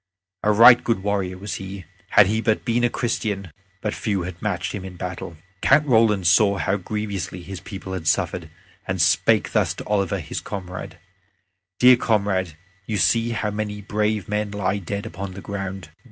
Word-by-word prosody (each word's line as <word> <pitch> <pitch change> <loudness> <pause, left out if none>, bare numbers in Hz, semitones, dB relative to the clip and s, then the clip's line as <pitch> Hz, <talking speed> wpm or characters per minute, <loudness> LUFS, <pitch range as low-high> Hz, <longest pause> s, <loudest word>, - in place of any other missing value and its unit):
A 105 - +3
right 120 +3 +8
good 115 -5 0
warrior 100 -3 -1
was 100 +2 -5
he; 95 -1 -7 0.2
had 100 - +7
he 110 +3 0
but 110 -2 0
been 120 0 +1
a 120 - +4
Christian, 105 -7 -2 0.3
but 105 - -2
few 100 -5 -2
had 85 -1 -7
matched 100 -4 -2
him 100 - -5
in 95 -1 -8
battle. 90 -2 -6 0.2
Count 150 - +4
Roland 110 -7 +3
saw 100 +4 +4
how 95 +3 0
grievously 100 -2 -4
his 95 +1 -7
people 95 +1 -8
had 85 -4 -5
suffered - - 0 0.4
and - - -2
spake - - +3
thus - - +1
to - - -8
Oliver 100 -3 0
his - - -5
comrade: 90 -2 -7 0.8
"Dear 125 0 +7
comrade, 100 -8 0 0.3
you 110 - -1
see 115 +7 +2
how 110 -2 -2
many 105 0 -4
brave 105 0 -1
men 105 0 -1
lie 100 -1 -1
dead 100 +3 -5
upon 100 -3 -6
the - - -7
ground. 95 -4 -5
100 Hz, 180 wpm, -23 LUFS, 95-105 Hz, 0.8 s, right